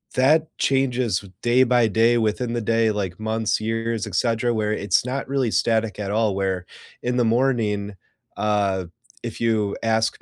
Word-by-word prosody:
that 155 +5 +3
changes 125 -7 +1 0.2
day 120 +2 +4
by 120 -2 +3
day, 115 +3 +3
within 115 +2 -1
the 120 - -1
day, 115 0 +2
like, 100 -3 -4
months, 110 0 -1
years, 115 0 -2
etcetera, 115 +4 0
where 105 -1 0
it's 105 +3 +1
not 130 +2 -3
really 130 -4 0
static 110 -3 0
at 100 - -3
all, 105 -2 +1
where 95 -2 -2 0.4
in 125 0 -1
the 120 - +3
morning, 110 -4 0 0.4
uh, 100 -3 0 0.4
if 115 -2 -6
you 110 -3 +1
ask 110 0 0
115 Hz, 160 wpm, -23 LUFS, 105-120 Hz, 0.4 s, day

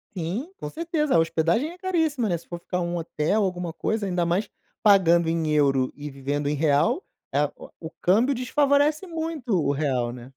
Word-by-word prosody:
Sim, 195 - -3
com - - -6
certeza, 320 - -1
a - - +6
hospedagem 165 - +1
é 355 - -13
caríssima, 320 - 0
né. 170 - +1
Se 170 - -17
for 175 -1 -6
ficar 180 +1 -3
um 175 0 -2
hotel, 165 +5 0
alguma 180 -3 -2
coisa, 220 -2 -2
ainda 180 -2 0
mais 185 +5 0 0.3
pagando 170 -5 +5
em 165 -1 0
euro 135 -3 +2
e 145 0 -7
vivendo 140 +1 -3
em 150 - 0
real, 155 - +2 0.3
é 145 +1 +3
o - - -11
o 160 -1 -7
câmbio 230 +10 +3
desfavorece 285 +6 +2
muito 320 - -4
o 140 - +1
real, 130 -5 0
né. 120 -1 -9
180 Hz, 190 wpm, -25 LUFS, -, 0.3 s, a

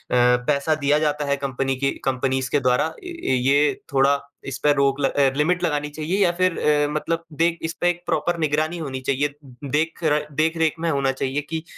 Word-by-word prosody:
पैसा 125 +5 +2
दिया 145 0 +2
जाता 150 -1 0
है 140 0 +1
कंपनी 135 -1 -2
की 140 0 +1
कंपनीज़ 130 0 0
के 145 - +3
द्वारा, 125 +1 +2 0.2
य 345 - -3
ये 145 +2 +4 0.2
थोड़ा 135 +1 +4 0.3
इसपे 140 +2 +1
रोक 140 0 +1
ल 135 - +2
अ, 140 -2 +2
लिमिट 175 +4 +1
लगानी 150 -3 0
चाहिए 155 +6 -3
या 175 - +3
फिर 185 -2 +2
अ, 145 -1 +2
मतलब 165 +2 -2 0.2
देख 170 0 +2
इसपे 170 +2 0
एक 175 0 -2
प्रॉपर 170 +1 0
निगरानी 155 +2 0
होनी 135 -5 -4
चाहिए। 140 +2 +2 0.4
देख 160 +3 0
र 150 -1 +2
देख-रेख 160 0 +1
में 165 - -1
होना 140 -3 +1
चाहिए 135 +2 -2
कि 160 -1 -3
150 Hz, 190 wpm, -22 LUFS, 135-160 Hz, 0.4 s, ये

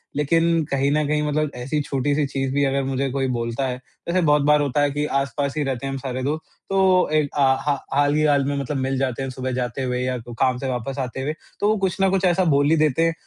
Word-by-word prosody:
लेकिन 165 +3 +2
कहीं 140 0 +1
न 150 +1 +2
कहीं 150 0 +1
मतलब 150 0 0
ऐसी 130 +5 -2
छोटी-सी 145 +2 0
चीज़ 135 0 -2
भी 145 +1 +2
अगर 135 0 0
मुझे 135 0 -1
कोई 135 -1 -1
बोलता 115 +3 -2
है। 125 - -2 0.3
वैसे 180 +1 +1
बहुत 150 -1 +4
बार 150 0 +4
होता 145 0 0
है 145 - +2
कि, 145 +1 -1
आस-पास 140 0 -1
ही 150 - +1
रहते 135 -1 -3
हैं 135 - -2
हम 135 - -3
सारे 130 -1 -4
दोस्त 155 +3 -2 0.3
तो 190 -3 +3
ए 155 - +4
अ, 145 - -5
हा 140 +1 +2 0.2
हाल 145 +1 +3
ही 155 - +2
हाल 140 -2 +3
में 145 - -1
मतलब 140 +1 -3
मिल 135 0 -1
जाते 135 0 -1
हैं 135 - -3
सुबह 130 0 -4
जाते 125 +1 -2
हुए 125 0 -1
या 125 0 -1 0.2
काम 130 -1 +2
से 135 - -4
वापस 130 +3 -3
आते 130 0 -3
हुए। 150 +3 -2 0.3
तो 205 - +1
वो 215 - +2
कुछ 190 -2 -1
न 195 - +4
कुछ 195 0 +1
ऐसा 180 +1 +3
बोल 145 +1 +3
ही 160 - +5
देते 155 +1 +2
हैं। 165 - +1
140 Hz, 260 wpm, -22 LUFS, 130-150 Hz, 0.3 s, ही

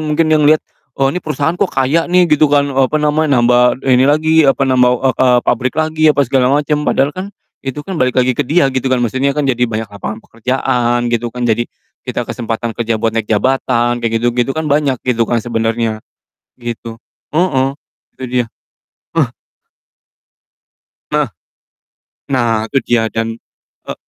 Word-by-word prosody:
mungkin 155 +1 +1
yang 150 -1 +4
lihat, 155 0 +3 0.3
"Oh, 135 0 +1
ini 180 - -3
perusahaan 150 -1 -1
kok 185 +2 0
kaya 140 +6 0
nih?" 180 0 +4
Gitu 155 -2 +3
kan, 140 -1 +2
eee, 135 0 +3
apa 155 - 0
namanya, 150 -1 +1
nambah 125 +1 +3
ini 130 -1 +4
lagi, 155 +2 +2
apa, 135 0 +2
nambah, 130 -1 +3 0.2
eee - - -27
eee, 125 -1 +5
pabrik 130 0 0
lagi, 155 0 -1
apa 145 -2 +3
segala 130 0 +2
macam, 150 +2 +1
padahal 140 +2 +1
kan 185 +1 -6 0.3
itu 140 +2 -6
kan 185 -2 -5
balik 125 -1 +1
lagi 130 0 +3
ke - - -3
dia 160 +1 +3
gitu 130 0 -1
kan, 130 - +2
maksudnya 130 +5 -1
kan 150 - 0
jadi 125 -3 0
banyak 110 -1 -4
lapangan 110 +2 -6
pekerjaan 120 0 -1
gitu 120 0 0
kan, 125 +1 -5
jadi 120 +1 0 0.4
kita - - -2
kesempatan 115 0 -4
kerja 115 0 -1
buat 115 0 -1
naik 110 -2 -2
jabatan, 120 +1 +1
kayak 115 -1 -1
gitu 120 0 +2
gitu 120 +2 0
kan 160 - -1
banyak 145 -3 +1
gitu 115 -3 0
kan 120 - +1
sebenarnya, 115 -1 -1 0.6
gitu. 115 -1 -6 0.3
Heeh, 150 -5 +1 0.5
itu 130 - -6
dia, 125 -1 0 0.7
ah. - - +1 1.8
Heeh. - - +1 1.1
Nah, 115 -4 +1
itu 140 - 0
dia, 120 -2 +2
dan 115 0 -1 0.6
e - - -2
130 Hz, 175 wpm, -15 LUFS, 120-150 Hz, 1.8 s, eee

